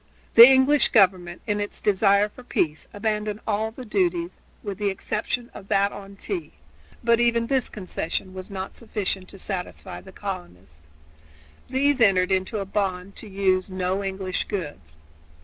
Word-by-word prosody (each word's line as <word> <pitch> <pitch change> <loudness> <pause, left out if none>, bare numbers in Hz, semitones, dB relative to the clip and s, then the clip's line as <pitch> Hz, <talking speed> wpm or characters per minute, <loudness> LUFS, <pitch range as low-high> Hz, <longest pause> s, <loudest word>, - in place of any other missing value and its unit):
The 235 +1 +12
English 270 +2 +5
government, 180 -4 +3
in 210 -2 0
its 205 0 -4
desire 200 0 +3
for 210 - -14
peace, 160 -9 -1
abandoned 210 0 -2
all 215 +1 0
the 250 +3 -10
duties 180 -4 0 0.2
with 200 -1 -5
the 205 -1 +1
exception 235 +5 -3
of 195 - -11
that 200 +1 +2
on 200 0 -10
tea; 350 - -5 0.5
but 235 0 +4
even 235 -1 +3
this 265 +1 0
concession 185 -2 -4
was 185 0 -8
not 190 -1 -5
sufficient 195 -5 -3
to - - -11
satisfy 175 - -6
the - - -13
colonists. 85 -3 -8 0.8
These 270 +1 +2
entered 190 -4 +4
into 190 +3 0
a 200 - -2
bond 195 -1 -2
to 220 - -9
use 190 -1 +1
no 185 +1 -1
English 190 -1 -2
goods. 145 - -6
195 Hz, 155 wpm, -24 LUFS, 185-220 Hz, 0.8 s, The